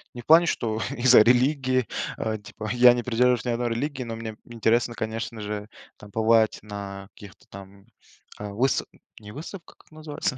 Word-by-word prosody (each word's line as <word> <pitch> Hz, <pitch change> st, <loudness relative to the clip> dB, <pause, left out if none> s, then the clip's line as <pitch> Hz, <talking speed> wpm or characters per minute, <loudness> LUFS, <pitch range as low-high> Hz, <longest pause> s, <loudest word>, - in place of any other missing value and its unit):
Не 120 Hz, -, -7 dB
в -, -, -22 dB
плане, 165 Hz, +2 st, +6 dB
что 110 Hz, -7 st, -1 dB, 0.2 s
из-за 125 Hz, -2 st, +7 dB
религии, 130 Hz, +1 st, +2 dB, 0.3 s
э, 110 Hz, -1 st, -2 dB
типа 110 Hz, +1 st, -8 dB
я 125 Hz, 0 st, +7 dB
не 120 Hz, -1 st, -3 dB
придерживаюсь 125 Hz, +1 st, +1 dB
ни -, -, -1 dB
одной 120 Hz, 0 st, -1 dB
религии, 130 Hz, +3 st, -3 dB
но 115 Hz, -1 st, -6 dB
мне 110 Hz, -1 st, -7 dB
интересно, 120 Hz, 0 st, 0 dB
конечно 110 Hz, 0 st, -5 dB
же, 105 Hz, 0 st, -5 dB, 0.3 s
там 105 Hz, -, -14 dB
побывать 110 Hz, 0 st, +3 dB
на 100 Hz, -2 st, -8 dB
каких-то 100 Hz, -2 st, -15 dB
там, 100 Hz, 0 st, -13 dB, 0.5 s
э, 105 Hz, 0 st, -6 dB
выста 120 Hz, +7 st, 0 dB, 0.3 s
не 105 Hz, -1 st, -11 dB
выставках, 170 Hz, -, -10 dB
как -, -, -25 dB
называется? 155 Hz, -3 st, -4 dB
115 Hz, 175 wpm, -25 LUFS, 105-125 Hz, 0.5 s, из-за